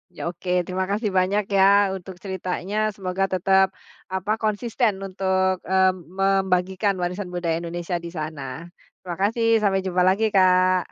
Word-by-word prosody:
Ya, - - -8
oke 180 +1 -8 0.2
terima 185 +1 -1
kasih 210 +1 0
banyak 200 +3 +1
ya 190 - +6 0.3
untuk 185 0 -9
ceritanya. 190 +1 -4 0.2
Semoga 190 0 -2
tetep 190 +1 +4 0.5
apa 190 +3 -2
konsisten 220 +1 0
untuk, 190 -1 0
eee, 190 0 +3 0.3
membagikan 190 0 +1
warisan 180 +1 -3
budaya 170 -2 -1
Indonesia 175 +1 -4
di - - -5
sana. 155 -1 -6 0.3
Terima 175 -2 -6
kasih, 230 +2 +1 0.2
sampai 195 -1 +2
jumpa 180 -1 +1
lagi, 205 +4 +2
Kak. 185 -1 +3
190 Hz, 145 wpm, -23 LUFS, 180-195 Hz, 0.5 s, ya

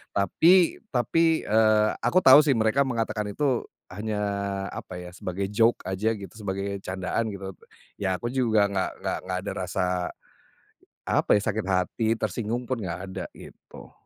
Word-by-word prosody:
Tapi 165 - +4
tapi, 160 +6 +2
eee, 110 0 +4
aku 185 - +3
tahu 130 +2 +10
sih 140 -3 +2
mereka 110 +5 +2
mengatakan 115 -3 -2
itu 135 0 0 0.2
hanya 105 +2 -3 0.5
apa 90 - -7
ya, 90 - -9
sebagai 95 +1 -3
joke 115 +3 +2
aja 105 +4 0
gitu, 100 -4 -9
sebagai 100 -1 -4
candaan 95 +5 -2
gitu. 95 -1 -6 0.5
Ya 95 -2 0
aku 120 - -3
juga 115 -6 +2
enggak 95 -1 -1 0.3
enggak 90 0 -3
ada - - -3 0.2
rasa 90 +1 -1 1.2
apa - - +3
ya, 105 - 0
sakit 110 -2 -3
hati 95 +4 +1
tersinggung 120 +2 -3
pun 130 -3 -2
enggak 90 -3 -4
ada - - -4
gitu - - -14
110 Hz, 150 wpm, -26 LUFS, 95-120 Hz, 1.2 s, tahu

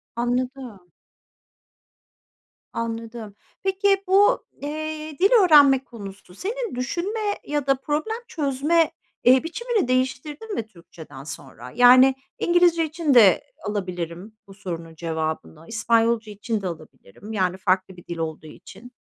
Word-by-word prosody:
Anladım. 245 -5 -3 1.8
Anladım. 230 -2 -5 0.3
Peki 390 0 +2
bu, 395 +2 +4 0.2
eee, 310 +1 -5
dil 390 +3 +4
öğrenme 285 -5 +6
konusu 200 -6 -11
senin 450 - -4
düşünme 345 - -3 0.3
ya 290 -2 -2
da 275 - +4
problem 310 +10 -2
çözme, 300 +3 +1 0.3
eee, 255 +2 +6
biçimini 440 - -1
değiştirdin 260 - -2
mi 220 - -3
Türkçeden 170 -7 -13
sonra? 150 - -10
Yani 255 +2 +7 0.2
İngilizce 345 -1 +3
için 315 -1 -1
de 215 -7 +6 0.2
alabilirim 185 0 -5
bu 195 - -13
sorunun 170 -5 -7
cevabını, 160 - -4
İspanyolca 225 0 +1
için 210 +1 -3
de 190 - -3
alabilirim, 155 - -10
yani 185 -3 0
farklı 190 -1 0
bir 175 - -14
dil 170 - -6
olduğu 160 -1 -5
için. 245 +10 -14
245 Hz, 120 wpm, -23 LUFS, 190-305 Hz, 1.8 s, Yani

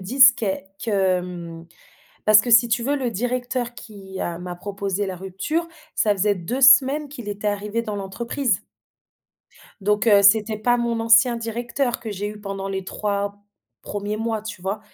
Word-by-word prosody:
disent 260 +7 +6
qu'e 195 -6 -2 0.2
que 190 -5 +1
mmh 170 -2 -8 0.6
parce 215 0 +7
que 240 +2 -2
si 235 +1 +7
tu 230 +1 0
veux, 285 +3 +1
le 255 -4 -1
directeur 245 +2 -2
qui 195 -5 -10
a 170 -1 -3
m'a 180 0 -7
proposé 200 +1 -3
la 185 - -4
rupture, 195 - -3 0.3
ça 210 - +2
faisait 205 +1 +1
2 235 +10 -4
semaines 275 +2 +6
qu'il 245 -7 -9
était 205 +1 -3
arrivé 210 +2 -2
dans 215 -3 -5
l'entreprise 235 +7 -2 1.2
donc 210 +3 +1
heu, 200 -2 +6
c'était 215 +2 +4
pas 245 +3 +2
mon 235 -1 -1
ancien 230 +2 +5
directeur 235 +2 -2
que 225 -2 -6
j'ai 205 +1 -4
eu 210 0 -9
pendant 195 -1 -5
les 190 -1 -4
3 200 0 -3 0.5
premiers 205 +1 -4
mois, 225 -1 -2
tu 215 -4 -8
vois? 200 +3 -3
210 Hz, 175 wpm, -22 LUFS, 195-235 Hz, 1.2 s, parce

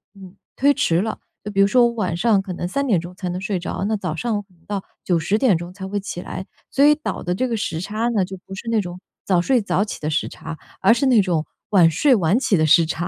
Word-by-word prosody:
嗯， 190 -1 -13 0.2
推 285 +2 +4
迟 175 -12 +2
了， 220 +2 -3 0.2
就 210 - -5
比 195 -1 +2
如 200 - +6
说 245 +4 +4
我 235 - -3
晚 185 -7 -1
上 210 +1 +3
可 195 - -7
能 175 - -3
3 280 +9 -1
点 195 -8 +3
钟 175 +2 -9
才 185 -1 -4
能 180 +1 -3
睡 200 -2 -2
着， 180 +2 -3
那 220 - +1
早 180 -5 -3
上 220 +2 -1
可 195 -2 -29
能 165 - -30
到 200 -2 -3 0.2
9、10 175 +4 +1
点 230 -6 +3
钟 175 +1 -7
才 190 -1 -7
会 205 +1 -2
起 195 -3 -6
来。 190 - -6 0.3
所 275 - +3
以 300 0 +6
倒 310 - -4
的 180 0 -1
这 255 +7 0
个 235 - -1
时 160 -6 -2
差 215 +5 -2
呢， 210 -6 +1
就 190 +1 -8
不 195 - -7
是 220 +4 -9
那 225 -2 +3
种 180 -1 -7 0.3
早 185 -3 +3
睡 245 +5 +2
早 200 -1 +1
起 215 - -6
的 150 - -2
时 155 - 0
差， 160 - -8 0.2
而 - - +5
是 240 +4 0
那 245 -5 +5
种 170 -5 0 0.2
晚 180 -5 +6
睡 260 - +4
晚 190 +2 +2
起 215 -7 +2
的 155 - +3
时 165 +2 +6
差。 170 +2 -3
195 Hz, 290 characters per minute, -21 LUFS, 175-225 Hz, 0.3 s, 如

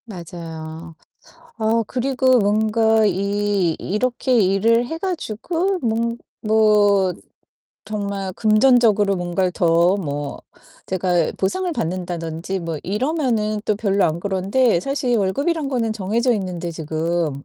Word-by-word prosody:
맞아요. 165 -4 -8 0.6
아 225 +1 +1
그리고 255 +1 +2
뭔가 220 +1 +2
이 200 -2 0
이렇게 245 +4 0
일을 220 +4 +3
해가지고 340 - -2
뭔 230 0 -1 0.3
뭐 210 -3 +4 0.7
정말 200 -3 -4
금전적으로 215 -2 +4
뭔가를 175 +1 -1
더 170 +2 +3
뭐 145 -6 -4 0.5
제가 180 -3 0
보상을 355 - -1
받는다든지 175 - -3
뭐 165 -2 -4
이러면은 220 - -1
또 215 - +2
별로 200 -2 +1
안 160 +2 0
그런데 200 +4 +1
사실 260 +1 -1
월급이란 280 - 0
거는 235 -5 -1
정해져 220 +4 0
있는데 180 -5 -3
지금 160 0 -2
205 Hz, 245 characters per minute, -21 LUFS, 180-235 Hz, 0.7 s, 뭐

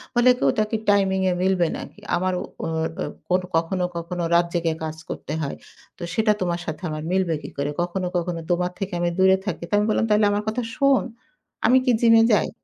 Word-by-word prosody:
বলে 240 +1 +5
কি? - - -13
"ওটা 215 - +1
কি 225 - +1
টাইমিং 195 -2 +3
এ - - +1
মিলবে 185 -3 +2
নাকি? - - -10 0.2
আমারও" 180 0 -1 0.2
ও - - -2 0.7
ওর 185 - +3
কখনো, 175 +3 0
কখনো 170 +1 -4
রাত 170 0 +4
জেগে 165 -2 0
কাজ 160 0 -4
করতে 150 - -5
হয়। 140 - -4 0.4
"তো - - -8
সেটা 220 +2 +3
তোমার 175 -1 0
সাথে 160 +1 -5
আমার 155 0 -4
মিলবে 185 -3 +1
কি - - -6
করে? 140 +1 -1
কখনো, 180 +1 -2
কখনো 170 -1 -2
তোমার 180 +1 +1
থেকে 195 -2 -4
আমি 175 0 +1
দূরে 190 0 +5
থাকি।" 180 -3 -4
তা - - -8
আমি 210 - +1
বললাম, 215 - +2
"তাইলে 210 0 +4
আমার 205 +1 0
কথা 245 +3 -2
শোন। 275 -1 +3 0.6
আমি 250 +3 +6
কি 250 - +4
জিম 230 -1 +7
এ - - +5
যাই? - - +2
185 Hz, 215 wpm, -23 LUFS, 170-210 Hz, 0.7 s, জিম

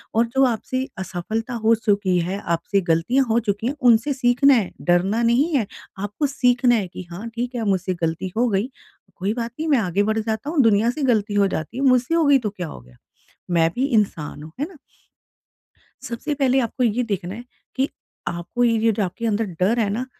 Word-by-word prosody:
और 230 +1 +4
जो 270 - +5
आपसे 255 +2 -2
असफलता 215 +7 -4
हो 230 +1 +6
चुकी 205 -4 +1
है, 185 +4 -2
आपसे 170 +4 0
गलतियाँ 205 +12 +2
हो 225 +1 +3
चुकी 215 0 -2
हैं, 275 - -2
उनसे 240 +3 +4
सीखना 260 +2 +4
है, 210 -7 0
डरना 185 +6 +2
नहीं 260 +8 +2
है। 240 -6 +2 0.3
आपको 205 +8 -2
सीखना 250 -2 +3
है 205 -5 -1
कि 180 0 -9
हाँ, 200 +7 -6
ठीक 245 +1 -3
है 230 -2 -2
मुझसे 190 -2 0
गलती 165 +3 -1
हो 245 +1 +3
गई। 200 +5 0 0.5
कोई 195 +3 -1
बात 235 0 -4
नहीं 320 - -2
मैं 280 -4 +4
आगे 195 -1 +1
बढ़ 220 +1 0
जाता 220 +5 -3
हूँ। 310 -4 +3
दुनिया 225 0 +4
से 285 +3 -5
गलती 215 -5 +1
हो 200 -1 +4
जाती 180 +6 -4
है। 270 - -1
मुझसे 255 +3 +3
हो 330 -2 +3
गई 285 -1 +5
तो 215 -4 -2
क्या 180 -4 -6
हो 150 - -9
गया? 60 0 -20 0.5
मैं 165 -1 +3
भी 265 +3 +1
इंसान 200 - -1
हूँ, 155 +1 -11
है 295 - 0
ना। 370 - -14 1.3
सबसे 290 +6 -4
पहले 270 -2 +2
आपको 245 +1 -1
ये 235 +2 +1
देखना 185 0 -3
है 240 - -9 0.3
कि 270 +2 +1 0.4
आपको 175 +8 -2
ये 225 -1 +3
जो 210 - -1
आपके 190 +6 -4
अंदर 220 0 +1 0.2
डर 215 +6 +2
है 220 -3 +2
ना 235 +5 -2
225 Hz, 210 wpm, -22 LUFS, 195-250 Hz, 1.3 s, हो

